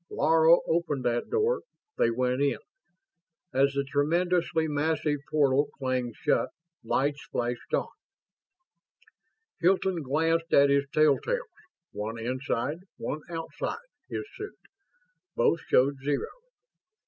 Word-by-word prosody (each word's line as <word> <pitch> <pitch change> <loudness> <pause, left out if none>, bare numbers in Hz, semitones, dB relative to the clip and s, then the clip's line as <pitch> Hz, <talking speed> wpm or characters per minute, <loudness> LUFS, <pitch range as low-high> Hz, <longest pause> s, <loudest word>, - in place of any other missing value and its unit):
Laro 160 +2 +5
opened 155 -6 0
that 120 0 0
door. 455 +3 +1 0.4
They - - +4
went 125 +2 0
in. 140 -1 +2 1.0
As 135 +1 +3
the 140 0 0
tremendously 165 +3 +1
massive 150 0 0
portal 145 -1 +3
clanged 130 -3 -2
shut, - - +1 0.3
lights 145 +1 0
flashed 120 0 -3
on. - - 0 1.7
Hilton 185 0 +2
glanced 165 +4 0
at 140 0 +6
his 140 0 +3
tell 155 -2 +4
tales, - - -2 0.4
one 110 +2 -4
inside, 130 +5 -2 0.2
one 155 - -4
outside, 165 -1 -4 0.3
his 415 - -4
suit. 415 +2 -7 0.8
Both 165 - +3
showed 140 +2 +4
zero. 145 0 -1
145 Hz, 110 wpm, -28 LUFS, 130-165 Hz, 1.7 s, at